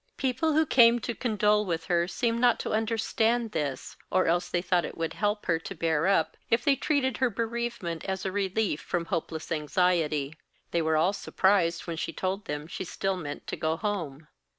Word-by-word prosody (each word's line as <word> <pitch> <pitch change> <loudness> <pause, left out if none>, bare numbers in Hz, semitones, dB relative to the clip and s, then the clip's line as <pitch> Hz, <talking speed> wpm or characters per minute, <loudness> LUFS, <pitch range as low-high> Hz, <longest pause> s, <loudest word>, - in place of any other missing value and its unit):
People 275 +5 0
who 315 +1 +4
came 235 -4 +6
to 240 - -3
condole 210 -3 +2
with 165 -4 -3
her 175 -1 +1
seemed 230 +6 -1
not 245 -1 +4
to - - -4
understand 225 +1 +1
this, 145 -7 -3
or 185 0 +2
else 175 +2 +1
they 175 - 0
thought 175 0 +1
it - - -6
would 165 -1 -2
help 210 0 -1
her 165 -2 +1
to 195 +4 -8
bear 160 0 +1
up 165 -5 +2
if 230 +1 +2
they 280 - +5
treated 265 -3 0
her 260 -2 +2
bereavement 230 -6 -3
as 190 0 -3
a 190 - -1
relief 195 -3 -1
from 170 -1 -2
hopeless 165 -2 -4
anxiety. 155 -2 +1 0.4
They 170 - +1
were 160 -1 +2
all 175 +5 +3
surprised 190 -4 +1
when 170 -2 -4
she 165 - -3
told 190 +4 -2
them 150 0 -4
she 175 - -5
still 195 +2 -2
meant 145 -5 -6
to - - -4
go 160 +1 -1
home. 160 -8 -4
185 Hz, 195 wpm, -28 LUFS, 165-225 Hz, 0.4 s, came